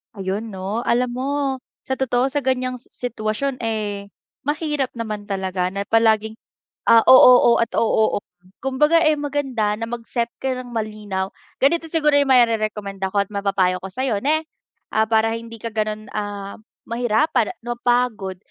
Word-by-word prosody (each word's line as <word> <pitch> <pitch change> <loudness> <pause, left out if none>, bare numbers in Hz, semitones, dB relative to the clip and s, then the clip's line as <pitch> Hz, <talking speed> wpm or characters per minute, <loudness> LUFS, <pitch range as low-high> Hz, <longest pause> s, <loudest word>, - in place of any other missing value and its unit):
Ayun 200 +3 -4
'no, 200 +6 -3
alam 245 +1 +2
mo 270 +2 -2 0.2
sa 265 - -3
totoo 260 0 +1
sa 290 - -3
ganyang 255 -1 0
sitwasyon 245 +2 -4
eh 205 -3 -3 0.3
mahirap 295 -2 -1
naman 215 -3 -5
talaga 190 -2 -2
na 200 - -2
palaging 220 -1 +2 0.5
ah 230 - +7
o-oo 250 -2 +8
at 230 - 0
o-oo. 220 -2 +2 0.4
Kumbaga 300 +5 +3
eh 310 -2 +3
maganda 270 -7 -1
na 230 - -3
mag-set 235 0 -3
ka 265 -1 -2
ng 245 - -11
malinaw. 210 -4 -4 0.2
Ganito 325 +4 +2
siguro 300 -2 +2
yung 285 -1 +2
marerekomenda 215 -5 +2
ko 200 0 +1
at - - -31
mapapayo 195 -2 +1
ko 190 - -6
sa'yo 220 -1 -2
na 315 +2 +1 0.5
ah 220 0 +3
para 225 0 +2
hindi 230 0 -7
ka 225 0 -6
ganon 215 0 -2
ah 205 -1 -5 0.3
mahirapan 240 +5 +1 0.2
napapagod 240 -5 0
230 Hz, 145 wpm, -21 LUFS, 210-260 Hz, 0.5 s, o-oo